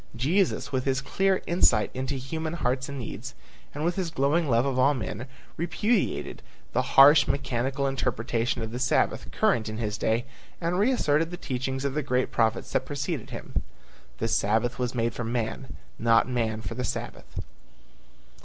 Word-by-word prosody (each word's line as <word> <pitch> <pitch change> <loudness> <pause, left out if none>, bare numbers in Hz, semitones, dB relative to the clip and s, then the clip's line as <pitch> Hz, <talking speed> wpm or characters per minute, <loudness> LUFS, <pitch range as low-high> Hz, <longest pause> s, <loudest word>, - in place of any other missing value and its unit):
Jesus 165 - +1
with 130 -1 -1
his 135 -1 +1
clear 190 +7 +1
insight 120 -11 +3
into 130 +2 -2
human 160 +5 -4
hearts 130 -4 -1
and 140 - -5
needs, 130 +2 -6 0.4
and 150 +2 -3
with 175 +2 0
his 185 -3 -1
glowing 150 +2 +1
love 120 +1 +3
for 130 +3 +4
men, 115 +1 -5 0.3
repudiated 180 +7 0 0.3
the - - +3 0.2
harsh, 145 +1 +9
mechanical 135 +1 -1
interpretation 120 -2 -1
of 110 - -5
the 120 - -4
Sabbath 130 0 +1
current 110 -2 +1
in 110 - -5
his 105 -2 -3
day 115 +2 +1 0.3
and 175 +2 0
reasserted 165 - +2
the 175 - -6
teachings 130 -2 -3
of 140 - 0
the 150 - 0
great 130 -2 0
prophets 110 -1 +1
that - - +1
preceded 145 -2 -3
him; - - -4 0.6
"The - - -1
Sabbath 110 +5 +1
was 125 0 -1
made 115 -1 0
for 120 - -4
man, 115 +2 -3 0.2
not 115 0 +4
man 115 -3 -1
for 100 - -5
the 125 - -3
Sabbath." 120 - -5
130 Hz, 165 wpm, -27 LUFS, 115-150 Hz, 0.6 s, harsh